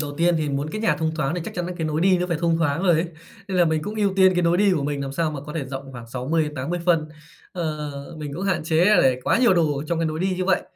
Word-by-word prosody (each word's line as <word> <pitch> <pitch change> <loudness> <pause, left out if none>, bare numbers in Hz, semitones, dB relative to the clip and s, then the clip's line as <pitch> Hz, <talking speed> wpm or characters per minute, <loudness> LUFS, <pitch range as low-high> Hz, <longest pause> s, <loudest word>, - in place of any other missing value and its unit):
đầu 145 -2 -3
tiên 170 +2 +3
thì 155 -1 -1
muốn 140 +1 -2
cái 215 - -4
nhà 225 - +2
thông 160 0 -1
thoáng 150 0 -1
thì 180 - -3
chắc - - -7
chắn 175 -1 -2
nà 180 - -4
cái 165 -3 -2
nối 155 0 -1
đi 185 0 +4
nó 180 - -1
phải 170 -3 -1
thông 170 -1 +2
thoáng 165 +2 0
rồi 180 - +4
ấy. 165 +3 +1 0.4
Nên 190 - -2
là 175 - +6
mình 160 -1 0
cũng 210 +6 -5
ưu 205 -2 +1
tiên 190 -1 +6
cái 180 - +1
nối 170 0 +3
đi 200 0 +4
của 155 - -1
mình 145 0 -2
làm 135 0 -5
sao 160 +2 0
mà 150 -3 -5
có 150 +2 -8
thể 155 -4 -3
rộng 135 0 -7
khoảng 120 -2 -9
60 130 +7 -1
đến 150 -1 -4
80 150 +6 -3
phân. 165 -3 +2 0.4
Ờ, 155 -4 -3 0.3
mình 150 -2 -6
cũng 175 - -5
hạn 185 -4 0
chế 160 +1 +3
để 135 -11 +4
quá - - +3
nhiều 235 -6 +5
đồ 160 -4 +2
ở 145 - -4
trong 170 +1 -1
cái 165 - 0
nối 155 0 -3
đi 185 0 0
như 185 - -1
vậy. 190 -1 +2
160 Hz, 330 wpm, -23 LUFS, 150-180 Hz, 0.4 s, là